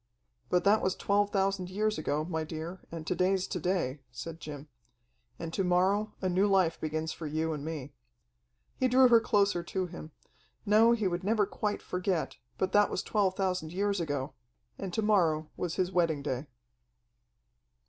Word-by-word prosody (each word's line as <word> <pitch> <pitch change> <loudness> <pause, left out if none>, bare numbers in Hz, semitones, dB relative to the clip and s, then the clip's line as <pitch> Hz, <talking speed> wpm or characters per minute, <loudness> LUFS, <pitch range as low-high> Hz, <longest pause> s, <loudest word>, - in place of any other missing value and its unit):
"But 180 -1 +2
that 210 +2 +4
was 185 - 0
twelve 205 0 +1
thousand 195 -2 0
years 210 0 0
ago, 155 0 -1
my 160 -2 -2
dear, 160 +3 -6
and 165 -2 -6
to - - 0
day's 185 +1 +1
to 180 - -4
day," 170 -6 -1
said 165 +7 -7
Jim. 145 -2 -8 0.7
"And 165 -1 -6
to 195 - 0
morrow 190 +4 +2
a - - +2
new 185 +3 +3
life 190 -4 +2
begins 155 0 -2
for 160 - -6
you 160 +2 -1
and 145 -2 -5
me." 150 -3 -5 0.8
He 260 - +2
drew 255 0 +6
her 235 -1 +7
closer 200 -5 +2
to 185 +2 -2
him. 170 -3 -9 0.5
No, 220 +3 +6
he 220 -4 +1
would 175 0 -2
never 210 +1 +2
quite 205 +1 -3
forget, 180 -2 -2 0.2
but 190 0 0
that 205 +1 +4
was - - -2
twelve 195 -3 +1
thousand 180 -4 -1
years 200 0 0
ago... 145 -3 -3 0.4
and 195 -2 -5
to 220 - -1
morrow 165 -7 +2
was 175 -2 -3
his 185 0 0
wedding 165 -5 +1
day. 135 0 -3
180 Hz, 180 wpm, -30 LUFS, 160-200 Hz, 0.8 s, her